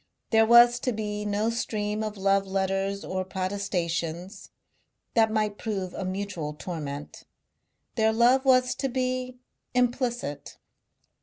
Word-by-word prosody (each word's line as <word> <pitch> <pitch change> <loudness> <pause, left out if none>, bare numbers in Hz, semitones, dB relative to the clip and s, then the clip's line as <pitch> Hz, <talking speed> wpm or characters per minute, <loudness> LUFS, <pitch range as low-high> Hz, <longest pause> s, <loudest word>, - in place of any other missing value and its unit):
There 220 -1 +5
was 240 +1 +7
to 250 - -1
be 210 -1 -3
no 210 +2 0
stream 210 -2 -2
of 215 -1 -4
love 195 0 +2
letters 195 +1 -1
or 185 0 -2
protestations. 185 -1 -3 0.6
That 225 -1 +4
might 215 -1 -1
prove 195 -4 -3
a - - -4
mutual 185 -5 -4
torment. 145 -1 -6 0.7
Their 220 -1 +2
love 240 +4 +4
was 255 -2 +4
to 270 - -2
be 255 0 -2 0.4
implicit. 245 - -1
210 Hz, 125 wpm, -27 LUFS, 190-235 Hz, 0.7 s, was